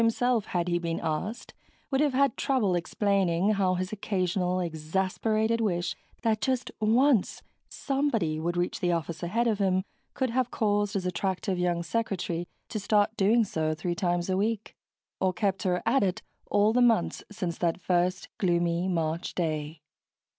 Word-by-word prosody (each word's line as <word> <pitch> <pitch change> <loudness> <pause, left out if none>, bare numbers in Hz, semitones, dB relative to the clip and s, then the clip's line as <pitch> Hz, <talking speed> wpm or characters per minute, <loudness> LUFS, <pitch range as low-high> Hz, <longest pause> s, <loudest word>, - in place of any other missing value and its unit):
himself, 230 0 +2
had 175 -1 -1
he 175 0 +1
been 165 -1 -2
asked, 180 +10 -3 0.4
would 270 +1 +2
have 290 -3 +2
had 275 -2 +3
trouble 245 -9 +1
explaining 190 +1 +1
how 190 -3 +2
his 185 +2 -3
occasional 185 -3 0
exasperated 190 +7 0
wish 175 -5 0 0.3
that 220 -2 +1
just 260 -2 -1
once 230 +1 +3 0.3
somebody 250 - -1
would 175 +2 -2
reach 175 0 -1
the 175 - +1
office 165 -1 -2
ahead 220 +8 0
of 220 -3 +1
him 190 -1 +2 0.3
could 260 -3 0
have 250 0 +1
caused 205 -3 0
his 190 -2 -1
attractive 185 0 -1
young 175 -1 0
secretary 175 -4 -2 0.2
to 215 - -4
start 205 +1 +2
doing 220 +3 +4
so 155 -6 -1
three 175 +2 -2
times 175 0 0
a 190 - +1
week... 215 +2 -1 0.4
or 190 -1 +2
kept 195 -1 0
her 180 -1 0
at 245 +4 +3
it 185 -2 0 0.2
all 205 +2 +3
the 250 - +3
months 235 -2 +2
since 180 -5 -4
that 170 0 0
first 180 0 0
gloomy 175 -1 +1
March 165 -1 -1
day. 155 -2 -2
190 Hz, 160 wpm, -28 LUFS, 175-220 Hz, 0.4 s, doing